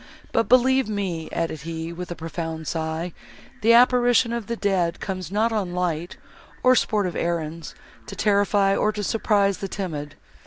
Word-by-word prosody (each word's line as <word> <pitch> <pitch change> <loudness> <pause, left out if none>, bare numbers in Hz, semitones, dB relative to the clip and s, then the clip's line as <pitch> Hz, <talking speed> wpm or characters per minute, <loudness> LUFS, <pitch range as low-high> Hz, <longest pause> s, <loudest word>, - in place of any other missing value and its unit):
But 230 - +1
believe 260 0 +4
me," 190 -6 -3
added 165 -3 -2
he, 165 +1 -5
with 180 +1 -7
a 175 - -4
profound 160 -1 -5
sigh, 160 +1 -3 0.5
"the 225 +2 +5
apparition 245 -1 +5
of 235 -3 -4
the 235 - -2
dead 185 -6 0
comes 185 -3 -4
not 220 +3 +1
on 195 -5 -2
light, 175 -1 -2 0.5
or 255 0 +6
sportive 205 -6 0
errands, 165 -1 -3 0.3
to - - -7
terrify, 200 -1 +2
or 215 - +2
to 210 -1 -4
surprise 200 -2 +1
the 195 - -3
timid." 155 -7 -5
190 Hz, 160 wpm, -24 LUFS, 165-215 Hz, 0.5 s, or